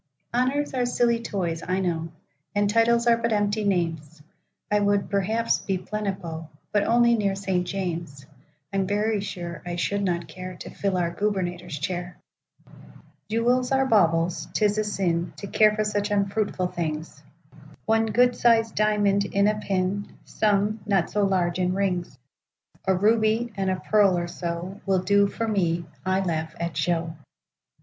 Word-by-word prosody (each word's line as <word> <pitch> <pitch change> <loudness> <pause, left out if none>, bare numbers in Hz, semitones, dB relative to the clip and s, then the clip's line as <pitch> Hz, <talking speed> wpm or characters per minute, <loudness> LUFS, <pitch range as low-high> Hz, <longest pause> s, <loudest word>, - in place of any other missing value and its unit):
Honors 265 +4 0
are 250 -2 0
silly 240 -1 +2
toys, 175 -7 -2
I 185 +1 -1
know, 165 -3 -1 0.5
And 205 0 +3
titles 230 +2 +3
are 235 -1 +5
but 230 0 -1
empty 210 0 +1
names;I 165 +1 -3
would, 205 -1 +1
perhaps, 215 +4 +1
be 190 -1 -2
Plenipo,—But 185 -2 -4
only 235 0 +4
near 200 -4 +1
St. 190 -2 -1
James; 170 -7 -4 0.5
I'm 195 -1 0
very 210 +1 0
sure 175 -4 -6
I 175 -1 -4
should 200 +3 -1
not 175 -3 -1
careTo 185 +2 -8
fill 195 -2 0
our 170 -1 0
Gubernator's 180 -5 -2
chair. 175 +4 -4 1.1
Jewels 245 +3 +1
are 270 0 +3
baubles; 170 -7 +2
'tis 210 0 +2
a - - +4
sinTo 190 -2 -2
care 215 -1 +5
for 215 - +1
such 210 0 -1
unfruitful 200 -2 0
things;—One 170 +7 -4
good 245 +3 +3
sized 225 -2 +3
diamond 205 -1 +2
in 200 +1 +2
a 210 0 +1
pin,—Some, 205 +2 -1
not 195 -4 +1
so 210 - +1
large, 180 -2 +1
in 180 0 +1
rings,—A 180 -1 -4
ruby, 220 +3 +2
and 195 -1 -1
a 185 - +1
pearl, 200 -4 +3
or 175 0 -2
so, 175 +3 -5
Will 190 -2 +2
do 200 +1 +4
for 225 +3 -3
me;—I 185 -1 -1
laugh 160 -3 -2
at 170 -2 -3
show. 165 +1 -1
195 Hz, 140 wpm, -25 LUFS, 175-215 Hz, 1.1 s, are